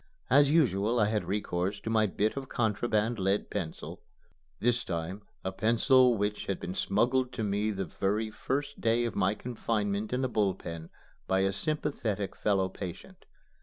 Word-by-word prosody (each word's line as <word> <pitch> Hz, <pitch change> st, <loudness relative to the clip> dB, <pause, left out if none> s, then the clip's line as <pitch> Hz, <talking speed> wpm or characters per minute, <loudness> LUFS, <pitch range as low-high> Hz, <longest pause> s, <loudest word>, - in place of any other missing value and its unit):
As 145 Hz, -1 st, +6 dB
usual 120 Hz, -, +3 dB
I 105 Hz, -, +5 dB
had 105 Hz, -1 st, 0 dB
recourse 100 Hz, -1 st, -1 dB
to 110 Hz, -, -3 dB
my 110 Hz, -1 st, +3 dB
bit 105 Hz, +3 st, 0 dB
of 135 Hz, -1 st, -5 dB
contraband 110 Hz, 0 st, 0 dB
lead 95 Hz, +2 st, 0 dB
pencil, 90 Hz, -6 st, -5 dB, 0.6 s
this 120 Hz, 0 st, +2 dB
time 85 Hz, +3 st, -4 dB, 0.2 s
a 95 Hz, -, -2 dB
pencil 120 Hz, +5 st, +4 dB
which 105 Hz, +1 st, -2 dB
had 100 Hz, -, -1 dB
been 90 Hz, -, -5 dB
smuggled 125 Hz, +7 st, +1 dB
to 110 Hz, -, -3 dB
me 105 Hz, +1 st, 0 dB
the 95 Hz, -2 st, -2 dB
very 105 Hz, +6 st, -1 dB
first 140 Hz, +6 st, -3 dB
day 115 Hz, +1 st, +2 dB
of 115 Hz, -, -3 dB
my 100 Hz, +1 st, +2 dB
confinement 105 Hz, -4 st, -2 dB
in 125 Hz, +1 st, 0 dB
the -, -, +2 dB
Bull 105 Hz, -6 st, +1 dB
Pen 85 Hz, -3 st, -7 dB, 0.4 s
by 95 Hz, 0 st, +2 dB
a 95 Hz, 0 st, +1 dB
sympathetic 110 Hz, -, -2 dB
fellow 95 Hz, -2 st, +1 dB
patient. 95 Hz, -2 st, -8 dB
105 Hz, 165 wpm, -30 LUFS, 95-120 Hz, 0.6 s, As